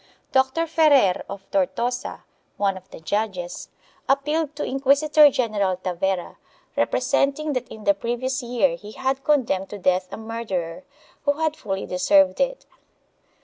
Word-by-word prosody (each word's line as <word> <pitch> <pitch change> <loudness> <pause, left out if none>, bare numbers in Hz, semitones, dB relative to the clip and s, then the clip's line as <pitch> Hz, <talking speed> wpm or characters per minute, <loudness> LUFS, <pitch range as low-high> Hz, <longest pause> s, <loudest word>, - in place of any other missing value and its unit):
Dr. 265 +5 +2
Ferrer 295 - +4
of 195 0 -8
Tortosa, 235 +6 -1 0.3
one 200 -1 +1
of 185 0 -12
the - - -11
judges, 185 0 -3 0.4
appealed 295 +2 +1
to 295 - -3
Inquisitor 285 +3 +5
general 210 -8 0
Tavera, 185 0 -2 0.4
representing 290 +2 +1
that 250 -2 -2
in 215 - -11
the 200 - +4
previous 240 +5 -2
year 250 +2 +1
he 210 -2 -11
had 265 +1 -2
condemned 240 -11 +1
to 205 - -7
death 185 -1 +1
a - - -6
murderer, 220 -6 -4 0.4
who 285 - +4
had 315 +1 -1
fully 195 -6 -4
deserved 285 +11 +3
it. - - -1
240 Hz, 140 wpm, -23 LUFS, 195-280 Hz, 0.4 s, Inquisitor